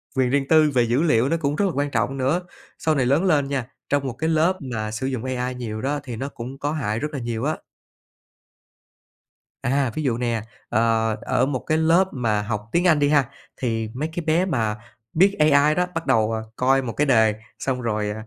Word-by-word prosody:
quyền 130 -2 +2
riêng 135 +1 +1
tư 155 -2 +5
về 125 -2 +3
dữ 120 +5 +1
liệu 130 -6 +3
nó 165 - +1
cũng 145 -2 -1
rất 205 - +1
là 190 - +1
quan 145 0 -1
trọng 120 +4 0
nữa. 140 +8 +1 0.4
Sau 155 -1 +1
này 130 -3 +1
lớn 140 +8 +2
lên 150 -7 +2
nha, 135 -3 -2 0.2
trong 140 -1 +1
một 125 - -3
cái 160 +6 -2
lớp 165 +4 +3 0.2
mà 110 -1 -3
sử 110 +5 -3
dụng 130 -3 -3
AI 125 0 -2
nhiều 110 -3 -5
đó 145 +2 -1
thì 125 -4 -6
nó 135 +5 -4
cũng 130 +1 -8
có 145 +1 -1
hại 115 -8 -2
rất 150 +1 -3
là 140 - -3
nhiều 115 -1 -3
á. 155 +2 0 2.0
À, 135 -1 +1
ví 155 - -2
dụ 120 -4 0
nè, 120 -3 -1 0.3
ờ, 115 -1 +2
ở 130 - +1
một 135 -3 -2
cái 155 - +2
lớp 165 +4 +4
mà 110 -5 0
học 105 +1 -4
tiếng 175 +4 +2
Anh 155 -3 +4
đi 145 0 +3
ha, 145 -4 +3 0.3
thì 115 -3 -2
mấy 150 +5 -3
cái 170 -2 -4
bé 165 +4 +2
mà 115 - -1 0.4
biết 195 +5 +4
AI 150 0 +5
đó 180 0 +2
bắt 165 - -3
đầu, 115 -4 +2
à, 110 - -2
coi 135 +1 +3
một 115 -3 -4
cái 150 - +1
đề 110 -5 +4 0.3
xong 130 -2 -2
rồi 105 -2 -1
135 Hz, 225 wpm, -23 LUFS, 115-150 Hz, 2.0 s, tư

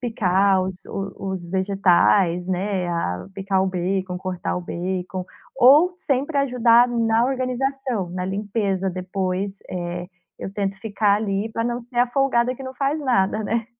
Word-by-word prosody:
picar 195 -5 +2
os 185 0 -4
os 195 -2 -5
vegetais, 185 -1 +2
né, 185 0 -1
a 130 - -2
picar 190 -1 0
o - - +1
bacon, 185 0 -2
cortar 180 -1 -3
o - - -2
bacon, 180 +1 -4 0.3
ou 290 +8 +6
sempre 285 -2 -1
ajudar 245 -3 +4
na 230 -1 +2
organização, 255 -5 -2
na 180 +1 -3
limpeza 195 -1 -1
depois, 185 +1 -3
eh, 175 0 -4 0.3
eu 195 - -5
tento 195 -1 -2
ficar 210 -2 +2
ali 205 0 -1
pra 230 - -1
não 240 0 -1
ser 245 +1 -13
a 245 - +5
folgada 255 -2 +1
que 270 - -9
não 260 0 -7
faz 280 +4 -1
nada, 220 -6 +1
né. 225 +1 -1
200 Hz, 150 wpm, -22 LUFS, 185-240 Hz, 0.3 s, ou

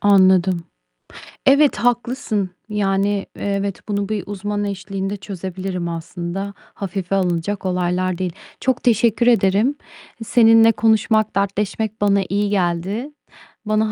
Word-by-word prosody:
Anladım. 190 -3 +4 0.8
Evet 280 +1 +5
haklısın. 240 -4 -1 0.2
Yani, 200 -1 0
evet 200 -1 -2
bunu 200 -1 -1
bir 215 -2 -2
uzman 205 +1 -3
eşliğinde 195 0 -4
çözebilirim 185 -2 -5
aslında. 170 +4 -5
Hafife 195 -1 -5
alınacak 185 +1 -1
olaylar 180 0 0
değil. 185 -2 -2 0.3
Çok 260 -1 0
teşekkür 235 0 +3
ederim. 220 +3 +3 0.5
Seninle 225 0 +6
konuşmak, 220 -1 +2
dertleşmek 205 +2 -1
bana 200 -1 +3
iyi 205 +1 0
geldi. 195 - -1 0.6
Bana 215 0 +1
200 Hz, 110 wpm, -20 LUFS, 185-215 Hz, 0.8 s, Seninle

